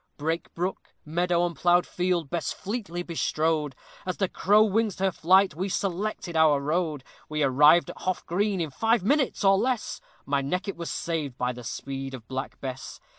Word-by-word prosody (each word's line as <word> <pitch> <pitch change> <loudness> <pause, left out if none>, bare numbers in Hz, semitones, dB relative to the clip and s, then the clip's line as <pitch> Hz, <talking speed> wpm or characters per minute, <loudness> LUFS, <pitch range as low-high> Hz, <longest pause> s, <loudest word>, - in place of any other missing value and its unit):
Brake, 160 +3 -2
brook, 180 +3 -4
meadow, 175 +2 +1
and 170 -1 -3
plough'd 175 0 +3
field, 175 -5 -1
Bess 170 -3 -1
fleetly 195 -5 -4
bestrode, 155 -4 -1 0.3
As 185 - -3
the 195 - +1
crow 210 +4 +4
wings 215 -1 +1
her 190 0 +1
flight 185 +3 +4
we 185 +6 -3
selected 190 -1 -2
our 155 -3 +5
road; 155 -1 -1 0.3
We 155 -1 0
arrived 150 +5 +5
at - - -14
Hough 185 0 -2
Green 195 +2 0
in 160 -4 -2
five 225 - +1
minutes, 270 +1 +1
or 195 0 +5
less 250 -1 -1 0.2
My 140 0 +1
neck 180 +9 -2
it 200 - -3
was 170 -1 -5
saved 155 -6 -3
by 125 0 -1
the 125 0 -10
speed 135 +4 -5
of 115 -4 -12
Black 130 0 -5
Bess. 130 -1 -6
170 Hz, 180 wpm, -26 LUFS, 150-190 Hz, 0.3 s, our